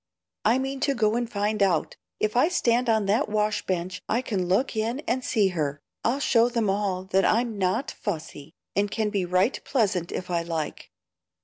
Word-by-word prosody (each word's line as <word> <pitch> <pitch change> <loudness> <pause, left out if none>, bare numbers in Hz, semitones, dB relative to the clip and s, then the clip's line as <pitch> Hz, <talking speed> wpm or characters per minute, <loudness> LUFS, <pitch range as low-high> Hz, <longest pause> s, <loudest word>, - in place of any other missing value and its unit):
"I 225 +4 +4
mean 270 +1 -3
to 280 0 +1
go 220 -2 +2
and 240 -1 -2
find 210 0 -1
out. 180 -6 +2 0.2
If 215 +1 0
I 250 +6 +5
stand 245 -8 +1
on 220 -2 +3
that 215 +8 +1
wash 210 0 0
bench 185 0 -2
I 240 +3 +1
can 190 -7 -1
look 210 +8 +1
in 230 +5 -1
and 255 -3 -1
see 210 -6 +2
her 155 -6 -1
work. 145 - -25 0.2
I'll 250 +4 +1
show 235 -4 +3
them 230 -5 +1
all 195 -2 -1
that 190 0 +1
I'm 225 0 +1
NOT 195 +9 0
'fussy,' 160 -5 -6 0.2
and 205 +1 +2
can 215 0 -1
be 195 -3 0
'right 185 +7 +1
pleasant' 195 - 0
if 180 0 -5
I 170 -1 +1
like." 165 -2 -4
210 Hz, 200 wpm, -26 LUFS, 185-235 Hz, 0.2 s, I